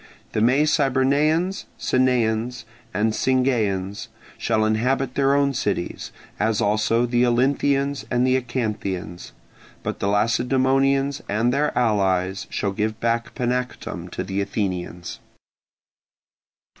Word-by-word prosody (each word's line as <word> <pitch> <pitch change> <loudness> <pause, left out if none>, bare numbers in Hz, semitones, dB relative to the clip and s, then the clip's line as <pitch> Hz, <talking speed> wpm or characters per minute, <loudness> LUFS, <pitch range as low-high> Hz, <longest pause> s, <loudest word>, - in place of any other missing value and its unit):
The - - -1
Mecybernaeans, 145 - +2
Sanaeans, 125 -2 +1 0.3
and 110 0 +1
Singaeans 110 -7 0 0.3
shall 110 -1 +1
inhabit 125 +4 0
their 140 0 +2
own 140 -1 +2
cities, 100 -7 -3 0.3
as 110 0 +1
also 110 +3 +2
the 120 0 +2
Olynthians 135 +3 +1
and 120 0 +2
Acanthians: 110 -9 -2 0.5
but - - -4
the 100 - -1
Lacedaemonians 135 +6 +2
and 115 +4 +1
their 150 +2 +1
allies 95 -5 +1
shall 100 - -1
give 110 +2 -2
back 115 0 -1
Panactum 125 0 -3
to - - -4
the 95 +1 -2
Athenians. 90 -4 -4
120 Hz, 105 wpm, -23 LUFS, 105-135 Hz, 0.5 s, Mecybernaeans